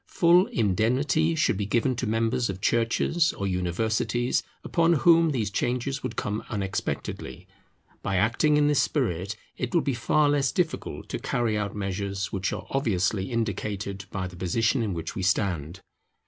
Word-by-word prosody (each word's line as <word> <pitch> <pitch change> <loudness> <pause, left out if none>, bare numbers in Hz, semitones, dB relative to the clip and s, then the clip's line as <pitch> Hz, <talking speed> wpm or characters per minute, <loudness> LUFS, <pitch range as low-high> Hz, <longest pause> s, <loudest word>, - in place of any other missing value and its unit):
Full 175 +3 +4
indemnity 125 - +1
should 155 -10 +2
be 100 -1 -2
given 120 +4 +1
to 125 - -2
members 115 +2 0
of 95 -1 -4
Churches 115 - +1
or 100 - -4
Universities, 110 +7 0 0.2
upon 170 0 +2
whom 165 +1 +5
these 115 -8 -1
changes 125 +5 -1
would 125 -2 -4
come 105 +2 -2
unexpectedly. 100 -3 -4 0.5
By 95 - -2
acting 115 +10 +3
in 145 0 +4
this 145 -2 +3
spirit 100 - -1 0.2
it 125 +4 -3
will 170 - +5
be 140 - 0
far 145 +5 +2
less 145 -2 +2
difficult 175 -3 -2
to - - -3
carry 120 -3 0
out 105 0 -2
measures 100 0 -3
which 95 0 -1
are - - -5
obviously 105 -6 0
indicated 100 -3 -3
by 95 -1 -3
the 90 -1 -8
position 115 +8 +1
in 105 -5 -1
which 80 -1 -4
we - - -4
stand. 90 -3 -1
110 Hz, 160 wpm, -26 LUFS, 100-135 Hz, 0.5 s, whom